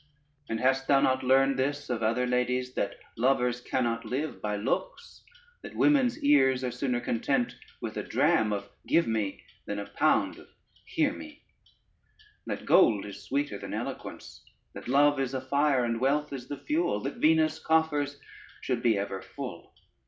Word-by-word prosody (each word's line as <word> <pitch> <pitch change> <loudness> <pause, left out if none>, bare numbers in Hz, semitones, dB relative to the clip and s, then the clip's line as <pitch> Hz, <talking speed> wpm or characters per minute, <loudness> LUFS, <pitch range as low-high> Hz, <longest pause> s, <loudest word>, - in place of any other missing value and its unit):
And 110 - -2
hast 135 +2 +1
thou 140 - +5
not 130 -1 +2
learned 135 +1 +3
this 145 +2 -1
of 120 -2 -2
other 115 +3 +1
ladies, 125 0 0
that 100 - -2 0.2
lovers 125 0 +1
cannot 120 -2 -1
live 130 +7 -4
by 105 -1 -2
looks, 125 - -3 0.4
that - - -10
women's 270 -4 +3
ears 135 -3 +4
are 125 - -1
sooner 125 0 -1
content 120 +1 -1 0.3
with - - -5
a - - -1
dram 110 -1 +2
of 100 -1 -3 0.2
give 170 - +3
me 110 -3 -2 0.2
than 105 - -3
a 100 - -4
pound - - +1
of - - -15 0.4
hear - - +1
me, - - -11 1.0
that - - -4
gold 105 -3 +4
is 100 - -9
sweeter 140 -7 -2
than - - -6
eloquence, - - -7 0.3
that - - -9
love 145 +2 +4
is 135 -1 -1
a - - 0
fire 140 0 +2
and 115 0 -2
wealth 145 +2 +1
is 130 -2 -6
the 145 - -5
fuel, 315 +3 0
that - - -4
Venus' 160 -4 +3
coffers 150 -3 +1 0.4
should 125 -3 -1
be 115 -3 +3
ever 100 -1 -3
full? - - -8
130 Hz, 165 wpm, -28 LUFS, 115-145 Hz, 1.0 s, thou